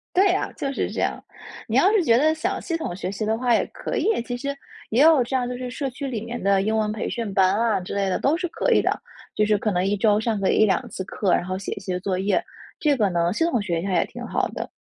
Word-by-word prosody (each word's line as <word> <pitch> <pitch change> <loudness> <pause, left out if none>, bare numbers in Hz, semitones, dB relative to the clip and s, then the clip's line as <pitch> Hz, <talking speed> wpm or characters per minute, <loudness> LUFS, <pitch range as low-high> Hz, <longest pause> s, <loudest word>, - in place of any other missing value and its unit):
对 380 0 +5
啊， 380 - -1
就 275 - -3
是 - - -2
这 - - -3
样。 - - -1 0.4
你 - - -2
要 395 - +5
是 425 -5 +3
觉 230 -7 +4
得 310 +3 +3
想 370 +5 -2
系 335 - -2
统 175 - -4
学 185 0 -4
习 205 +2 -3
的 220 +1 +1
话 245 -1 +2
也 - - +1
可 - - -4
以， 445 - +1
其 245 0 -4
实 280 +2 -3 0.4
也 235 - +3
有 310 -4 +6
这 265 +3 -4
样 250 -1 0
就 250 - -4
是 250 -1 -5
社 275 0 -3
区 270 +3 -7
里 230 -5 -3
面 235 +1 -6
的 195 0 +3
英 220 +2 0
文 215 -1 0
培 215 - -3
训 225 -5 -4
班 190 0 +4
啊， 230 -4 +2
之 180 - -6
类 200 -1 +1
的 185 - 0
都 300 +4 +2
是 355 0 -2
可 - - -1
以 - - +5
的。 - - -1 0.3
就 210 - +2
是 210 -1 +3
可 210 +1 -1
能 180 0 +1
1 200 +1 +1
周 210 0 +3
上 220 -2 -1
个 195 - +2
1-2 215 -3 +2
次 190 - -5
课， 195 -2 0
然 - - +2
后 185 +1 -3
写 195 - -6
一 - - -8
些 185 -2 -3
作 185 0 -2
业。 190 -2 +1 0.4
这 295 -3 +3
个 210 -5 +2
呢， 170 +1 +1
系 325 - 0
统 250 -9 +1
学 170 -5 -1
一 - - -6
下 195 - -2
也 - - +3
挺 - - -9
好 - - 0
的。 - - -6
220 Hz, 310 characters per minute, -23 LUFS, 195-275 Hz, 0.4 s, 有